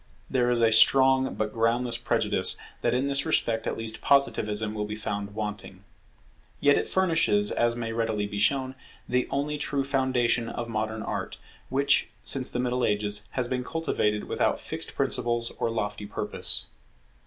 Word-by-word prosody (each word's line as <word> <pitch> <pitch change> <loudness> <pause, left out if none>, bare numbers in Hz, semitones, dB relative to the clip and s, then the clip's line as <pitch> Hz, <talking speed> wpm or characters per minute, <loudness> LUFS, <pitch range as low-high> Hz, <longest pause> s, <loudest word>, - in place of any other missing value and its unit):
There 125 -2 +2
is 120 -1 +1
a 115 -1 +4
strong 130 +3 +5
but 105 -1 -2
groundless 115 +1 +2
prejudice 115 - +1 0.2
that - - +1
in 130 +2 0
this 140 0 +2
respect 115 -8 0
at - - -2
least 115 -1 -5
Positivism 110 -6 +1
will 105 -1 -3
be 105 - -5
found 100 -1 -5
wanting. 105 -3 -6 0.8
Yet 145 0 +4
it - - -1
furnishes, 190 +3 +2
as 120 0 +1
may 115 -1 -4
readily 110 -2 -1
be 100 0 -5
shown, 130 +4 +1 0.3
the 125 0 0
only 150 +2 -2
true 140 -1 0
foundation 130 -4 0
of 120 - -5
modern 110 -1 -3
Art, - - -4 0.3
which, 140 +1 +2
since 130 -2 +3
the - - -4
Middle 125 0 -1
Ages, 105 0 0
has 125 -2 -1
been 125 0 -2
cultivated 125 -9 -1
without - - 0
fixed - - -4
principles 120 -1 0
or - - 0
lofty 105 -2 -3
purpose. - - 0
120 Hz, 165 wpm, -26 LUFS, 110-130 Hz, 0.8 s, strong